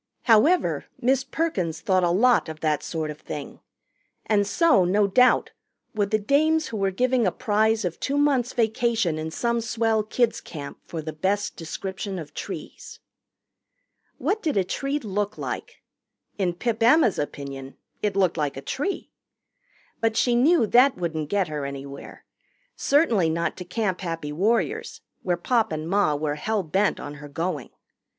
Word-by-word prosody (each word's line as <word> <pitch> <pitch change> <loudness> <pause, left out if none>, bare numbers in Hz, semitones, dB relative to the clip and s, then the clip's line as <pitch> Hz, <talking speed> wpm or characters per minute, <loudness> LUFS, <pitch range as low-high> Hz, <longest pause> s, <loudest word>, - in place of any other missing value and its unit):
However, 265 +11 +3
Miss 260 +2 +2
Perkins 205 - -2
thought 185 +2 +2
a 175 - +3
lot 225 +2 +3
of 155 0 -8
that 155 -2 +1
sort 155 -2 -3
of 150 - -10
thing, - - -7 0.7
and 205 -2 +2
so, 320 - +4
no 200 +4 +3
doubt, 250 +6 +4 0.4
would 205 -2 0
the 215 - +3
dames 310 +9 +2
who 225 - -4
were 195 -1 +1
giving 245 +3 +1
a - - +2
prize 220 -1 +1
of 175 -2 -3
two 280 +1 -1
months' 275 -4 +2
vacation 225 -7 +1
in 160 0 -3
some 235 +7 -1
swell 225 -1 +1
kids' 230 +2 0
camp 145 -4 -8
for 160 -2 -5
the 155 0 -5
best 195 +6 -1
description 190 +3 -5
of 150 -4 -8
trees. - - -8 1.2
What 430 +2 -1
did 305 -9 -1
a 195 - +4
tree 275 +9 -2
look 210 -4 -3
like? - - -6 0.6
In 180 -3 0
Pip 230 +4 -2
Emma's 240 - +5
opinion 140 -2 -6 0.2
it 205 -2 -1
looked 185 -3 +2
like 145 -3 -1
a - - -5
tree. 325 - -3 0.9
But 225 0 0
she 245 - +3
knew 260 +2 +4
that 250 +5 +5
wouldn't 160 -4 -3
get 200 -3 +1
her 150 -2 -4
anywhere 140 0 -8 0.5
certainly 235 - +3
not 170 +1 -1
to 180 - -7
Camp 190 0 -2
Happy 165 -4 -4
Warriors, 235 - 0 0.2
where 175 -2 0
Pop 230 +4 +1
and 155 0 -3
Ma 190 -5 +2
were 145 0 -1
hell 215 +4 -1
bent 190 +6 +1
on - - -6
her 145 - -9
going. 160 -2 -3
200 Hz, 165 wpm, -25 LUFS, 165-240 Hz, 1.2 s, Emma's